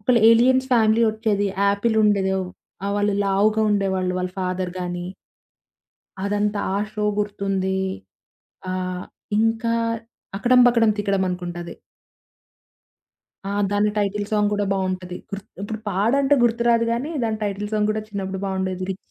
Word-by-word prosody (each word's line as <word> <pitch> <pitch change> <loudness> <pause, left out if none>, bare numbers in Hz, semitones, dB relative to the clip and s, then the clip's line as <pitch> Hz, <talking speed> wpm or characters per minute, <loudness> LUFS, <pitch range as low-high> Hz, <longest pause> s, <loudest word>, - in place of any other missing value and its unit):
ఒకళ్ళ 235 +3 +3
aliens 255 +3 +4
family 225 -1 +4
ఒచ్చేది. 215 -2 0 0.2
యాపిలుండేదో 200 -2 +2 0.5
ఆహ్, 200 - -1
వాళ్ళు 205 0 +1
లావుగా 210 +3 +2
ఉండేవాళ్ళు. 190 -2 0
వాళ్ళ 180 0 -2
ఫాదర్ 185 -1 -2
గాని. 175 0 -4 1.2
అదంతా. 205 0 0
ఆ - - +1 0.2
షో 210 -1 -2
గుర్తుంది. 195 -2 -1 0.9
ఆహ్, 185 0 -3 0.3
ఇంకా 225 +1 +1 0.6
'అకడం 250 +3 +4
బకడం 230 -2 +4
తికడం' 195 -2 +1
అనుకుంటది. 175 -1 -5 1.7
ఆ! - - -3 0.2
దాని 205 +1 +2
టైటిల్ 205 0 0
సాంగ్ 210 -1 +2
కూడా 205 0 0
బావుంటది. 185 -2 -2
గుర్త్ 200 0 -7
ఇప్పుడు 215 +2 -4
పాడంటే, 255 +9 +3
గుర్తురాదు 235 0 +3
గానీ, 250 +7 -2
దాని 220 -1 -1
టైటిల్ 205 +1 -3
సాంగ్ 210 0 +1
కూడా 215 0 -3
చిన్నప్పుడు 195 -2 -4
బావుండేది. 190 -1 -2
రిచ్ 190 - -3
205 Hz, 125 wpm, -22 LUFS, 190-220 Hz, 1.7 s, aliens